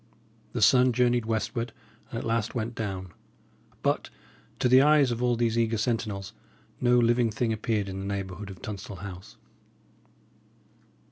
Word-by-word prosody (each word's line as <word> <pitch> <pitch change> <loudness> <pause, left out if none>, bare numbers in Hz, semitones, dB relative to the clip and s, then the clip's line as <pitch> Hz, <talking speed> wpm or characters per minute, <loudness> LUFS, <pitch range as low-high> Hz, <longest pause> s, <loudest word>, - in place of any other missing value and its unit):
The - - +1
sun 125 -1 +6
journeyed 120 -1 +2
westward, 115 +1 -2 0.4
and 115 - -5
at - - -4
last 115 0 -1
went 115 0 -2
down; 95 -6 -5 0.7
but, - - 0 0.5
to - - +2
the 130 +1 +7
eyes 145 -3 +5
of 120 0 -3
all 125 -1 +2
these 115 0 +1
eager 115 -1 +1
sentinels, 105 -3 -2 0.5
no 125 0 +4
living 120 0 +3
thing 110 +1 -1
appeared 110 -2 -1
in 95 0 -5
the 95 - -5
neighbourhood 100 0 -4
of 95 -2 -11
Tunstall 100 -1 -6
House. 95 -1 -10
115 Hz, 150 wpm, -27 LUFS, 100-120 Hz, 0.7 s, the